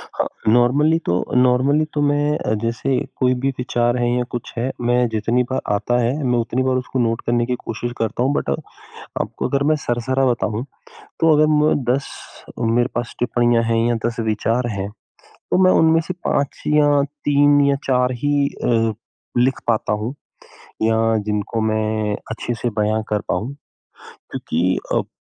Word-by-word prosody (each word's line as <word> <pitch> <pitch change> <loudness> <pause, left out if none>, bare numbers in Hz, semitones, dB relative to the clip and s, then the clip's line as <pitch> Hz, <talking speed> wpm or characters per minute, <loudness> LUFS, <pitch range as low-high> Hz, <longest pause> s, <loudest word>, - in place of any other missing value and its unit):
हाँ, - - 0 0.3
नॉर्मली 140 +7 +4
तो - - +1 0.2
नॉर्मली 130 +4 +3
तो 145 - 0
मैं 145 -5 +1
जैसे 115 +3 -1 0.2
कोई 130 0 +2
भी 135 - +2
विचार 120 -1 0
हैं 120 -1 +1
या 125 - +1
कुछ 120 - -6
है 125 +3 -1 0.2
मैं 125 0 +3
जितनी 115 +3 +1
बार 130 - 0
आता 110 +4 0
है 120 +2 +1
मैं 125 -1 +1
उतनी 120 +2 -1
बार 130 0 +1
उसको 130 0 -3
नोट 115 -1 0
करने 120 0 +1
की 125 0 -1
कोशिश 120 +2 -4
करता 115 +2 -1
हूँ। 140 +2 +1
बट 70 - -1 0.5
आपको - - -4
अगर 140 0 0
मैं 155 - +4
सरसरा 130 +3 0
बताऊँ, 115 -2 -1 0.6
तो 165 -1 +5
अगर 155 +1 +4
मैं 150 +1 +3 0.2
10 140 - -3 0.5
मेरे 120 +1 +2
पास 120 0 -3
टिप्पणियाँ 120 -1 +2
हैं 115 0 +1
या 120 - +1
10 120 0 -4
विचार 115 +2 0
हैं, 100 +1 -3 0.4
तो - - -3
मैं 185 - +6
उनमें 160 0 +4
से 185 - -2
5 140 -1 -1
या 145 -1 +4 0.2
3 145 0 +4
या 140 - +3
4 125 -1 +2
ही 145 -1 +2 0.2
अ, 115 -2 +2 0.4
लिख 130 +2 +2
पाता 110 -2 +1
हूँ। 110 +5 -3 0.7
या 110 0 +2 0.3
जिनको 105 +2 -2
मैं 110 -1 0 0.2
अच्छे 120 +1 -3
से 120 - 0
बयाँ 110 +1 +1
कर 105 - +1
पाऊँ। 130 +6 -2 0.6
क्योंकि 90 +3 -2 0.2
अब - - 0
120 Hz, 170 wpm, -20 LUFS, 115-135 Hz, 0.7 s, मैं